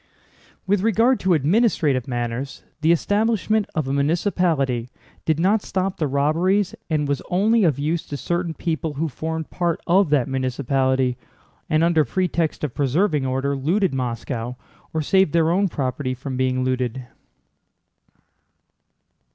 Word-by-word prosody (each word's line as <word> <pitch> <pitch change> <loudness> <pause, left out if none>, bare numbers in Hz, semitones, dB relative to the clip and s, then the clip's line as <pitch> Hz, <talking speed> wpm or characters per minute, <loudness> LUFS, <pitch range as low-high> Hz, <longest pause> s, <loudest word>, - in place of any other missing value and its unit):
With 195 0 +1
regard 225 +4 +3
to 185 -2 +2
administrative 155 - +2
matters, 120 +1 -4 0.2
the 160 +2 +4
establishment 215 +3 +1
of 155 -4 -1
a 135 - -1
municipality 140 - 0 0.4
did 160 -1 +1
not 200 +5 +3
stop 190 0 -2
the 155 - 0
robberies 170 +8 +1 0.2
and 150 -2 0
was 140 -2 -1
only 210 +5 +3
of 155 -7 +2
use 155 +4 -1
to 145 - -5
certain 175 +1 -2
people 160 -2 -3
who 160 +4 -1
formed 160 +2 -5
part 175 -2 -1
of 185 0 +3
that 140 -4 +2
municipality 130 -1 0 0.5
and 155 0 +3
under 165 -2 +4
pretext 170 +2 -1
of 145 -5 -2
preserving 145 +1 +1
order 135 +2 -1
looted 170 +6 +1
Moscow 125 -1 -3 0.4
or 160 -1 -1
saved 190 0 +3
their 165 -1 +3
own 195 +3 +2
property 130 -4 -2
from 130 +1 -6
being 130 0 0
looted. 130 -1 -2
155 Hz, 140 wpm, -22 LUFS, 130-180 Hz, 0.5 s, the